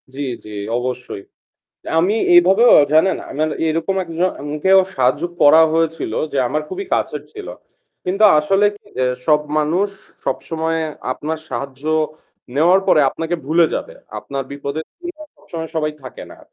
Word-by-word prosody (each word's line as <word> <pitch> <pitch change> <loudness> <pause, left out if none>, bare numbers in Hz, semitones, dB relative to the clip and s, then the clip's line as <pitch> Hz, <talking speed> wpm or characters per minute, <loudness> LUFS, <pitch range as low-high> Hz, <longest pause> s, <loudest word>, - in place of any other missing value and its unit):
জি, - - -8 0.3
জি - - -10 0.3
অবশ্যই। 125 -4 -5 0.8
আমি 185 +5 +2 0.2
এভাবেও 190 +7 +6 0.2
জানেন, 160 +5 +4
আমার 155 +3 -1 0.2
এরকম 165 +4 -1
একজন-কেও 165 +1 +1 0.2
সাহায্য 130 +3 +2 0.2
করা 155 +3 +7
হয়েছিল 165 0 -1 0.2
যে - - -1
আমার 150 +5 -1
খুবই 395 - -5
কাছের - - -1
ছিল। 415 -2 -8 0.6
কিন্তু 195 +4 0 0.2
আসলে 195 +7 +2 0.4
এ - - +3 0.2
সব 150 -1 +4 0.2
মানুষ 170 +7 +1 0.4
সবসময়ে 165 0 -2 0.3
আপনার 155 +4 -4
সাহায্য 135 0 -6 0.7
নেওয়ার 175 +6 +5
পরে - - +5
আপনাকে 165 +5 -3
ভুলে 165 +3 +4
যাবে। - - -4 0.3
আপনার 135 -1 -5
বিপদের 140 +2 -5 0.2
দিনে 350 -3 -8 0.2
সবসময় 160 -1 -7
সবাই 155 -1 0
থাকে 130 - -9
না। - - -14
160 Hz, 135 wpm, -19 LUFS, 145-180 Hz, 0.8 s, করা